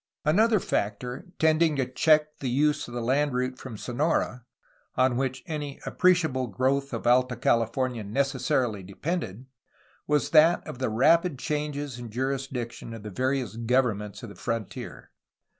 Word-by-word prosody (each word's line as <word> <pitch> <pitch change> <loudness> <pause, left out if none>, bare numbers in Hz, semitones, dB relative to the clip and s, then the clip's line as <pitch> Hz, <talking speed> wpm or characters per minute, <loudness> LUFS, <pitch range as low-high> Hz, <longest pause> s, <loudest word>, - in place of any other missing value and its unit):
Another 215 +8 +4
factor 125 - -3
tending 160 0 +3
to 135 -2 +1
check 150 +4 +2
the 130 - -2
use 145 +3 +1
of 120 - -10
the 120 - -2
land 140 +3 +1
route 130 0 -2
from 120 -5 -8
Sonora, 125 0 -1 0.5
on 130 -1 +3
which 130 0 -2
any 150 -3 -5
appreciable 160 -9 +2
growth 135 +6 0
of 115 -2 -5
Alta 125 +1 +3
Cali 115 -1 +2
fornia 125 -1 -2
necessarily 125 -1 0
depended, 110 - -4 0.6
was 150 -1 +1
that 160 +2 +5
of 125 - -8
the 130 - 0
rapid 160 +7 +3
changes 145 -2 -3
in 120 -1 -7
jurisdiction 125 -1 -4
of 110 - -10
the 105 - -7
various 130 -1 -1
governments 115 -3 0
of 115 - -7
the 100 - -11
frontier. 115 -3 -5
130 Hz, 150 wpm, -27 LUFS, 120-150 Hz, 0.6 s, that